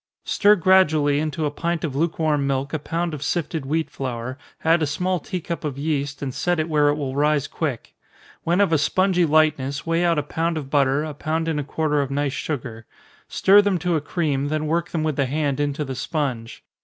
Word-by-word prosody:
_ - - -25
Stir 210 0 +5
gradually 155 -6 +3
into 155 0 -2
a 145 - -1
pint 170 +2 -2
of 145 -5 -3
lukewarm 155 -2 0
milk 140 +2 -2
a 155 - 0
pound 165 +3 -2
of 150 - -6
sifted 160 -3 -2
wheat 160 +2 -1
flour, 130 -1 -4 0.3
add 165 +1 +4
a 155 - +1
small 180 +5 -1
tea 180 +4 -4
cup 170 0 -5
of 145 -3 -3
yeast, 145 -1 -2
and 130 -2 -3
set 175 +3 0
it 155 - 0
where 150 -2 +3
it 145 - +2
will 135 -3 -4
rise 145 -1 +2
quick. 145 -8 -4 0.5
When 175 +4 +2
of 195 -5 +2
a 155 - +4
spongy 180 +3 +2
lightness, 150 -3 +1
weigh 165 +1 +1
out 170 -2 +2
a 150 - +1
pound 165 +2 -2
of 140 -3 -6
butter, 140 0 +2
a 155 -1 -5
pound 160 +3 -2
and 160 -2 0
a - - -2
quarter 150 0 0
of 140 - -3
nice 140 0 -1
sugar 120 -7 -5 0.4
stir 200 +2 +5
them 200 -2 +1
to 175 0 0
a 155 - 0
cream, 145 -3 -1
then 155 +1 -1
work 170 +2 0
them 160 -2 -2
with 155 -3 -1
the 140 -2 +1
hand 145 0 -1
into 145 +1 -1
the 135 - -4
sponge. 130 -4 -3
150 Hz, 225 wpm, -23 LUFS, 140-165 Hz, 0.5 s, Stir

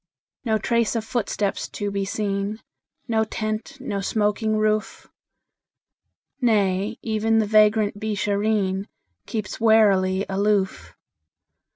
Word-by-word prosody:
No 220 -3 +1
trace 235 +1 0
of 225 -1 -2
footsteps 210 -4 -2
to 205 0 -4
be 200 0 -1
seen, 200 +1 -2 0.5
No 220 -2 +2
tent, 215 +4 -4
no 205 -7 -3
smoking 215 +1 0
roof; 215 0 -1 1.3
Nay, 205 -2 +1
even 225 0 +1
the 220 - +3
vagrant 210 -1 +3
Beeshareen 205 -1 0 0.4
Keeps 215 -4 -4
warily 200 -4 +4
aloof. 200 0 0
215 Hz, 100 wpm, -23 LUFS, 200-220 Hz, 1.3 s, warily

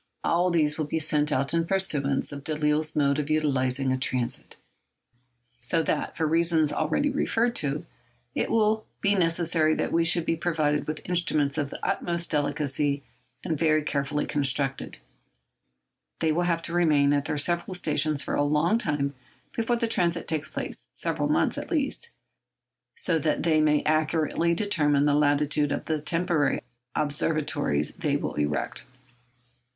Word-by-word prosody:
All 175 +2 +2
of 180 - 0
these 150 -2 +1
will 155 - 0
be 160 - -2
sent 150 -1 +1
out 135 +1 0
in 165 0 +1
pursuance 150 -9 0
of 140 -1 -8
Delisle's 150 0 +1
mode 140 -1 +2
of 150 0 -3
utilising 135 -3 +1
a 130 - -2
transit, 125 -1 -2 1.0
so 160 +7 0
that, - - -2
for 160 - +1
reasons 165 -2 +3
already 155 - 0
referred 240 -3 0
to, 145 0 -2 0.5
it - - -1
will 220 -1 +2 0.2
be 200 0 +2
necessary 165 -3 +2
that - - -1
they 170 - +3
should 165 0 +4
be 165 - +1
provided 155 -3 0
with 155 0 -5
instruments 155 -5 +1
of 145 -2 -2
the - - -7
utmost 170 -1 -2
delicacy, 145 -1 0 0.4
and 160 -5 -2
very 155 -1 +3
carefully 145 0 -1
constructed. 135 -1 0 1.2
They 160 - +1
will 175 +3 0
have 165 -1 0
to 170 - -3
remain 150 -5 +3
at 145 0 0
their 155 -1 -2
several 175 +5 +1
stations 155 -3 +1
for - - -4
a - - +1
long 150 +9 +2
time 145 -7 -1 0.4
before 230 +1 0
the 235 -1 -1
transit 170 -5 0
takes 155 -2 -1
place—several - - -3
months, - - +1
at - - -8
least—so 290 - -4
that 155 +1 0
they 160 -2 +3
may 150 -1 +2
accurately 155 +2 +1
determine 150 -8 +2
the 145 - +3
latitude 145 0 +2
of - - -3
the 155 -2 -2
temporary 165 -1 0 0.3
observatories 145 - 0
they - - -1
will - - -4
erect. 75 -2 -2
155 Hz, 155 wpm, -26 LUFS, 145-170 Hz, 1.2 s, should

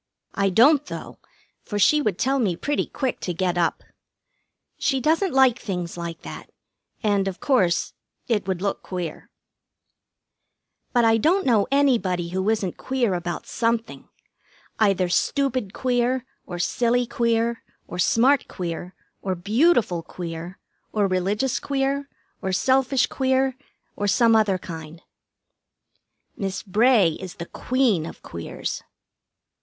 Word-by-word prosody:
I 200 -1 +1
don't, 275 - +5
though, - - -8 0.4
for 205 - -5
she 300 +9 +4
would 210 -10 0
tell 270 +4 +1
me 200 -8 +1
pretty 290 +10 -1
quick 260 -2 -3
to 180 - -3
get 180 0 0
up. 170 -2 0 1.0
She 270 -2 +1
doesn't 325 +7 +2
like 265 -2 +4
things 180 -5 -4
like 170 -1 -6
that, - - -9 0.5
and, 200 -2 +2
of 190 -1 -4
course, 190 -11 +2 0.3
it 210 -5 0
would 190 -1 -2
look 200 - -1
queer. 175 -4 -6 1.6
But 240 -2 +3
I 225 0 +5
don't 355 - +2
know 225 -6 +3
anybody 230 -11 +2
who 190 +3 -1
isn't 210 -5 -1
queer 255 -6 0
about 175 -1 -3
something. 230 -1 -2 0.7
Either 195 -4 +3
stupid 255 +3 0
queer, 250 +1 0 0.2
or 175 - -5
silly 240 +7 +1
queer, 235 0 0 0.3
or 180 - -7
smart 255 +9 +3
queer, 175 +1 -5 0.3
or 190 -1 -2
beautiful 210 - +2
queer, 170 +1 -7 0.3
or 210 -2 +1
religious 200 +7 0
queer, 275 0 -1 0.3
or 190 -2 -2
selfish 260 +5 +3
queer, 265 -1 +1 0.4
or 205 - -1
some 230 +2 +4
other 210 -4 +3
kind. 165 -2 -9 1.3
Miss 195 -1 -3
Bray 215 -1 +4
is 185 -2 -8
the 170 - -6
Queen 235 -8 0
of - - -11
Queers. 85 -1 -5
215 Hz, 130 wpm, -24 LUFS, 180-260 Hz, 1.6 s, don't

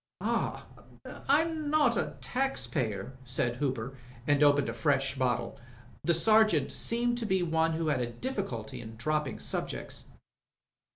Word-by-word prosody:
"Ahl - - -1 0.7
I'm 310 +1 +2
not 290 -6 +4
a - - -2
tax 270 +2 -1
payer," 115 - -3
said 120 -1 -1
Hooper, 130 -2 -2 0.3
and 145 0 +3
opened 145 -1 +5
a 115 - -2
fresh 135 +3 +1
bottle. 120 -3 -1 0.5
The 170 - +3
Sergeant 215 -6 +4
seemed 240 +1 +1
to 230 - -2
be 190 -3 +2
one 160 -1 +1
who 165 +1 -1
had 140 -4 +1
a 120 - -1
difficulty 190 - -4
in 110 0 -9
dropping 150 +2 -1
subjects. - - -4
150 Hz, 140 wpm, -30 LUFS, -, 0.7 s, opened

